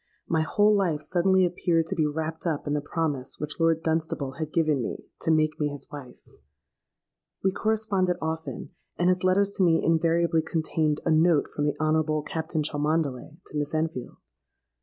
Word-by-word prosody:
My 160 -1 +1
whole 205 +6 +3
life 175 -7 +1
suddenly 185 +2 +3
appeared 170 -2 +1
to - - -3
be 155 -2 +2
wrapped 160 +3 -3
up 155 -3 -1
in 145 - -1
the 150 - 0
promise 145 -3 -2
which 150 +2 -5
Lord 165 -1 +2
Dunstable 160 -4 -1
had 155 -1 -3
given 155 -5 +2
me - - -5
to - - -2
make 155 0 +2
me 150 - +1
his 145 -2 -6
wife. 140 -4 -10 1.2
We 190 - +3
corresponded 200 -4 0
often; 160 0 -4 0.3
and 175 +1 +3
his 180 0 +1
letters 195 +2 +3
to 190 - +3
me 165 -2 +3
invariably 165 0 +2
contained 155 -1 -1
a 165 - +2
note 160 -1 +4
from 145 - -2
the 145 - 0
Honourable 155 -1 +1
Captain 160 0 -2
Cholmondeley 150 -1 -1
to - - -10
Miss 145 +1 -2
Enfield. 155 -5 -3
160 Hz, 175 wpm, -26 LUFS, 150-170 Hz, 1.2 s, note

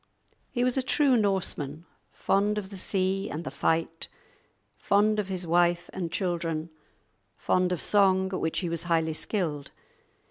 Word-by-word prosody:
He 245 - -1
was 250 +1 +2
a - - +2
true 270 0 +3
Norseman, 175 - -1 0.3
fond 205 +2 +1
of 200 -1 -5
the - - -7
sea 190 +1 0
and 160 +3 -5
the - - -5
fight, 165 0 -1 0.7
fond 215 +1 +2
of 205 - -2
his 185 -2 -3
wife 175 +1 +2
and 175 -3 -4
children, 170 -4 -2 0.7
fond 185 0 +1
of 180 - -1
song, 190 -2 +3
at - - -1
which 160 - -1
he 180 - -2
was 170 0 -3
highly 165 -2 +1
skilled. 155 -5 -2
185 Hz, 155 wpm, -27 LUFS, 165-200 Hz, 0.7 s, true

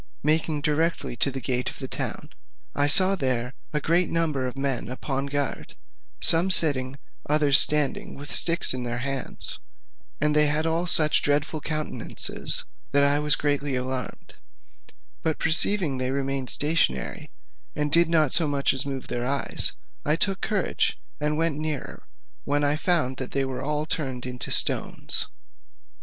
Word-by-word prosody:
Making 155 0 +1
directly 155 -2 -1
to 135 - +1
the 135 0 -5
gate 125 0 -2
of - - -11
the 135 - -6
town, - - -5 0.4
I 145 0 +2
saw 185 +6 +6
there 130 -7 -2 0.2
a 150 - -1
great 170 +4 +1
number 155 -6 -1
of 125 - -8
men 135 -4 -2
upon 135 +2 -4
guard, 140 -2 -3 0.4
some 170 +3 +4
sitting, 140 -8 +2
and - - -14 0.3
others 150 -2 +5
standing 150 -2 +2
with 145 +1 -7
sticks 170 -4 +6
in 130 - -4
their 120 -1 -3
hands; 135 +1 -4 0.6
and 150 +1 +1
they 150 0 +4
had 150 +2 0
all 165 +2 -1
such 155 -3 +6
dreadful 145 +2 -1
countenances 155 0 -2 0.3
that 140 0 +4
I 140 +1 +3
was 150 +1 +3
greatly 145 -2 -1
alarmed; 130 0 -5 0.9
but 160 -1 0
perceiving 160 -3 +2
they 130 0 -1
remained 135 -1 -3
stationary, 155 +1 0 0.5
and 150 0 -2
did 170 +1 +3
not 155 -5 +2
so 165 -1 +6
much 140 -1 +1
as 135 +1 -1
move 135 -2 -6
their 120 0 -3
eyes, 140 +1 +1 0.3
I 150 - +2
took 195 +3 -1
courage, 210 -4 -1 0.2
and 150 0 -1
went 160 -2 -1
nearer, 155 -2 -5 0.4
when 145 +1 -1
I 145 +1 +1
found 155 -6 0
they 135 +1 -3
were 130 -1 -5
all 150 +2 -2
turned 130 -6 -4
into 125 0 -5
stones. - - +1
145 Hz, 160 wpm, -24 LUFS, 135-155 Hz, 0.9 s, saw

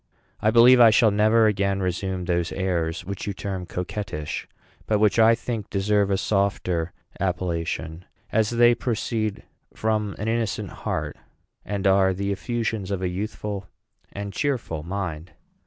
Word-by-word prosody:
I 110 - +3
believe 120 +3 +7
I 115 -2 +9
shall 110 0 +5
never 110 +2 +4
again 100 -2 +1
resume 95 0 -2
those 85 -1 0
airs 85 -3 -2
which 100 +2 -5
you 100 - -1
term 95 -2 -5
coquettish, 90 -4 -4 0.4
but 110 - +2
which 105 +1 +3
I 115 +1 +6
think 115 -3 -5
deserve 100 0 +1
a 100 - +2
softer 95 -4 0 0.3
appellation, 85 -2 -2 0.3
as 110 -1 +2
they 120 0 +5
proceed 110 -3 -2 0.3
from 110 -2 -1
an 105 - -4
innocent 115 -3 -1
heart, - - -4 0.5
and 100 0 -3
are 95 -1 +4
the 100 +1 -2
effusions 110 -2 -2
of 95 -2 -2
a 90 - 0
youthful 100 0 -4 0.4
and 100 0 -6
cheerful 120 - -2
mind. 85 -2 -5
100 Hz, 145 wpm, -24 LUFS, 90-110 Hz, 0.5 s, I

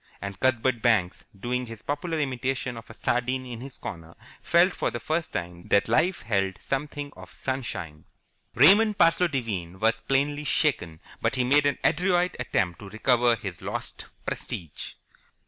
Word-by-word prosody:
And 100 -1 -6
Cuthbert 130 -2 +2
Banks, 105 -7 +2
doing 125 +3 -2
his 115 -1 -9
popular 160 +3 -2
imitation 130 -3 -2
of 115 - -10
a - - -9
sardine 125 +2 0
in 120 -2 -7
his 135 0 -7
corner, 85 -1 -8 0.3
felt 175 +2 +4
for - - 0
the 120 - -5
first 160 +6 -2
time 85 0 -5
that 100 - +3
life 160 +11 +2
held 95 -3 0
something 145 +1 -4
of - - -12
sunshine. 95 - -4 0.5
Raymond 205 - +6
Parsloe 170 +2 +4
Devine 100 - -3
was 115 +4 +2
plainly 145 +2 0
shaken, 110 - 0 0.2
but - - +1
he 130 - +2
made 145 +3 +4
an 140 - +1
adroit 180 +1 +2
attempt 95 -8 0
to 100 - -9
recover 120 +2 +3
his 100 -6 -7
lost - - -5 0.2
prestige. 80 -5 -5
125 Hz, 160 wpm, -26 LUFS, 100-145 Hz, 0.5 s, Raymond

